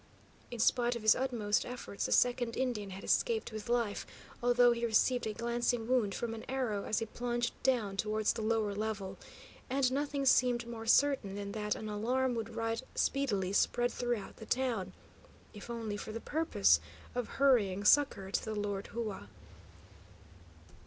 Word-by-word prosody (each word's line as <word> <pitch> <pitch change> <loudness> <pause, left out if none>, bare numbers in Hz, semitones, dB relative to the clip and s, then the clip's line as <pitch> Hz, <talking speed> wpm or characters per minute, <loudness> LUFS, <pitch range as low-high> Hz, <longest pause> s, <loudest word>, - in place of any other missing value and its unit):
In 240 - -6
spite 240 +2 +2
of 235 - -6
his 220 - +6
utmost 235 -6 0
efforts, 245 -5 -5
the - - -6
second 245 -1 +2
Indian 240 -6 -1
had 190 +1 -8
escaped 460 - +1
with 215 0 -7
life, 235 -4 0 0.3
although 245 0 +5
he 235 0 -2
received 235 +2 +2
a 215 - -2
glancing 235 0 -1
wound 240 -6 +1
from 235 -1 -3
an 225 - -7
arrow, 245 -7 -1
as 215 - -1
he 225 - 0
plunged 240 +1 -2
down 230 -7 +1
towards 215 +1 +1
the - - -5
lower 220 -2 0
level; 200 -2 -4 0.5
and 260 -1 +2
nothing 280 0 -1
seemed 245 -2 +4
more 225 -1 -7
certain 260 -6 +3
than 200 0 -5
that 210 0 -2
an 215 - -6
alarm 245 +5 0
would 230 -1 -4
right 225 +1 -1
speedily 205 -9 0
spread 240 +4 +2
throughout 240 -4 -3
the 220 - -10
town, 235 -8 -1 0.6
if 210 +2 -10
only 225 -3 -4
for 215 - -6
the 230 - -5
purpose 100 - +3 0.3
of 245 -2 -2
hurrying 215 -8 +3
succour 205 -6 +3
to - - 0
the 220 -1 -4
Lord 205 -1 -3
Hua. 215 - -5
230 Hz, 165 wpm, -33 LUFS, 210-245 Hz, 0.6 s, his